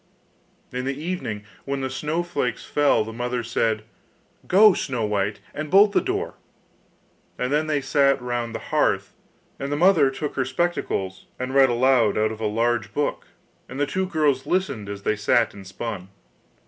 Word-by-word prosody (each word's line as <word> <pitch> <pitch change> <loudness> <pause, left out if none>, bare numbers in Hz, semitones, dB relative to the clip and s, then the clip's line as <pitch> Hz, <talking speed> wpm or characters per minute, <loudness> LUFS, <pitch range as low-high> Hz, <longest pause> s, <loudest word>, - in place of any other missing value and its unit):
In 125 +1 -3
the 135 +1 -3
evening, 155 - -4 0.2
when 140 0 -3
the 130 - -2
snowflakes 150 -1 -2
fell, 145 -6 +3
the 110 +1 -8
mother 120 +1 -2
said: 110 -2 0 0.6
'Go, 205 +2 +7
Snow 125 -9 -2
white, 105 0 -1
and 155 +1 -5
bolt 200 +4 +6
the - - +3
door,' 395 +3 -2 1.0
and 125 +3 -1
then 155 +1 +1
they 150 -2 0
sat 140 -1 +3
round 120 -2 -3
the - - -7
hearth, - - +1 0.5
and 140 +1 -4
the - - +1
mother 165 -5 +5
took 140 +2 -4
her 130 - +2
spectacles 130 - -2
and 130 +1 -4
read 135 -1 +6
aloud 120 -3 +3
out 110 0 +2
of 110 0 -8
a 110 - +1
large 115 +1 0
book, 145 - -1 0.4
and 135 - -7
the 145 - +3
two 185 +6 -2
girls 150 -6 +1
listened 140 - -1
as 100 0 -6
they 110 - +1
sat 110 +3 +2
and 100 -2 -11
spun. 95 -1 -6
130 Hz, 175 wpm, -24 LUFS, 110-150 Hz, 1.0 s, Go